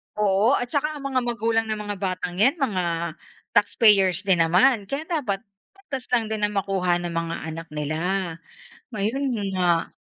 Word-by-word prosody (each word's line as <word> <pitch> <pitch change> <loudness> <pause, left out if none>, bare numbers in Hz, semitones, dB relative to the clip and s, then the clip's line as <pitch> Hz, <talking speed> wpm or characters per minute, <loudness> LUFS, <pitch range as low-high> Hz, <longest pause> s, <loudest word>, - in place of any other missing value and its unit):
Oo 210 +5 +3
at 245 0 -3
tsaka 300 +2 0
ang 290 - -8
mga 270 -2 +1
magulang 230 -1 0
ng 215 -1 -2
mga 205 0 -4
batang 185 -1 -3
'yan 265 +9 +4
mga 175 - -1 0.4
taxpayers 200 -3 +4
din 190 -3 +2
naman. 195 +7 +4
Kaya 275 +6 -3
dapat 255 - -1 0.3
patas 280 -10 -7
lang 230 -3 +2
din 215 -1 0
ang 210 0 -4
makuha 190 -3 +1
ng 175 -1 -4
mga 165 0 -2 0.2
anak 165 +1 -7
nila. 150 +1 -2 0.9
Ayun 220 +7 -1 0.3
nga. 175 -2 +1
205 Hz, 160 wpm, -24 LUFS, 180-245 Hz, 0.9 s, yan